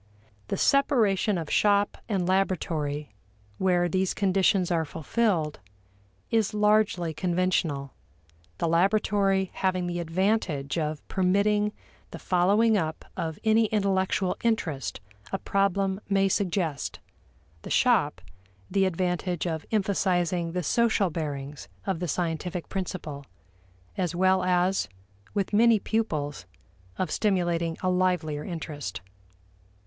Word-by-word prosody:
The -, -, -2 dB
separation 220 Hz, -8 st, +3 dB
of 160 Hz, -3 st, -5 dB
shop 205 Hz, -1 st, +3 dB
and 190 Hz, -4 st, 0 dB
laboratory, 155 Hz, -, -1 dB, 0.5 s
where 180 Hz, -2 st, +2 dB
these 185 Hz, +2 st, 0 dB
conditions 190 Hz, -2 st, +2 dB
are 165 Hz, -2 st, +2 dB
fulfilled, 165 Hz, 0 st, -1 dB, 0.7 s
is 220 Hz, -2 st, +1 dB
largely 210 Hz, -5 st, +2 dB
conventional, 170 Hz, -, 0 dB, 0.6 s
the -, -, 0 dB
laboratory 195 Hz, +2 st, +2 dB
having 185 Hz, -1 st, 0 dB
the 175 Hz, 0 st, -3 dB
advantage 170 Hz, -4 st, 0 dB
of 155 Hz, -1 st, -3 dB
permitting 205 Hz, +3 st, +2 dB, 0.4 s
the -, -, -8 dB
following 205 Hz, +5 st, +3 dB
up 160 Hz, -2 st, -4 dB
of 160 Hz, -2 st, -3 dB
any 220 Hz, 0 st, +4 dB
intellectual 195 Hz, -3 st, 0 dB
interest 170 Hz, -, -1 dB, 0.3 s
a -, -, 0 dB
problem 195 Hz, 0 st, 0 dB
may 195 Hz, -1 st, +3 dB
suggest; 180 Hz, -6 st, -1 dB, 0.6 s
the -, -, -9 dB
shop -, -, +2 dB, 0.5 s
the 195 Hz, -1 st, +3 dB
advantage 180 Hz, -1 st, -1 dB
of 160 Hz, -2 st, -3 dB
emphasizing 180 Hz, -5 st, 0 dB
the 180 Hz, 0 st, -1 dB
social 220 Hz, 0 st, +2 dB
bearings 145 Hz, -3 st, -5 dB, 0.2 s
of 190 Hz, -4 st, -1 dB
the 175 Hz, -, -2 dB
scientific 170 Hz, +1 st, -3 dB
principle, 170 Hz, -7 st, -4 dB, 0.8 s
as 180 Hz, -2 st, -1 dB
well 185 Hz, +1 st, +3 dB
as, 180 Hz, +1 st, +1 dB, 0.5 s
with 200 Hz, 0 st, -1 dB
many 230 Hz, +1 st, +5 dB
pupils, 155 Hz, -, -2 dB, 0.5 s
of 180 Hz, -4 st, -2 dB
stimulating 175 Hz, -5 st, 0 dB
a 185 Hz, -, +2 dB
livelier 180 Hz, -5 st, 0 dB
interest. 150 Hz, -, -5 dB
185 Hz, 115 wpm, -27 LUFS, 165-200 Hz, 0.8 s, many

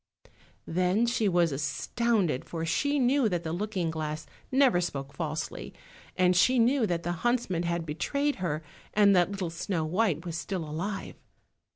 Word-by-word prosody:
Then 185 Hz, +6 st, +1 dB
she 235 Hz, -3 st, +1 dB
was 175 Hz, -3 st, +3 dB
astounded, 165 Hz, -, 0 dB
for 165 Hz, -1 st, -4 dB
she 285 Hz, -, +1 dB
knew 260 Hz, -2 st, +3 dB
that 175 Hz, -3 st, -2 dB
the 160 Hz, -1 st, -3 dB
looking 185 Hz, -3 st, -2 dB
glass 155 Hz, -1 st, -4 dB, 0.3 s
never 260 Hz, -9 st, +4 dB
spoke 140 Hz, -5 st, -4 dB
falsely, 155 Hz, +1 st, -4 dB, 0.4 s
and 180 Hz, 0 st, +4 dB
she 250 Hz, +8 st, +4 dB
knew 240 Hz, 0 st, +3 dB
that 170 Hz, -2 st, -1 dB
the 175 Hz, -, -1 dB
huntsman 240 Hz, -8 st, +1 dB
had 170 Hz, -1 st, -1 dB
betrayed 280 Hz, -, -1 dB
her, 160 Hz, -4 st, -2 dB, 0.3 s
and 200 Hz, -1 st, +6 dB
that 175 Hz, -1 st, +4 dB
little 195 Hz, -4 st, -3 dB
Snow 170 Hz, -1 st, -2 dB
white 180 Hz, -1 st, 0 dB
was 170 Hz, -2 st, -4 dB
still 175 Hz, -1 st, -3 dB
alive. 190 Hz, +7 st, -4 dB
180 Hz, 160 wpm, -28 LUFS, 165-220 Hz, 0.4 s, and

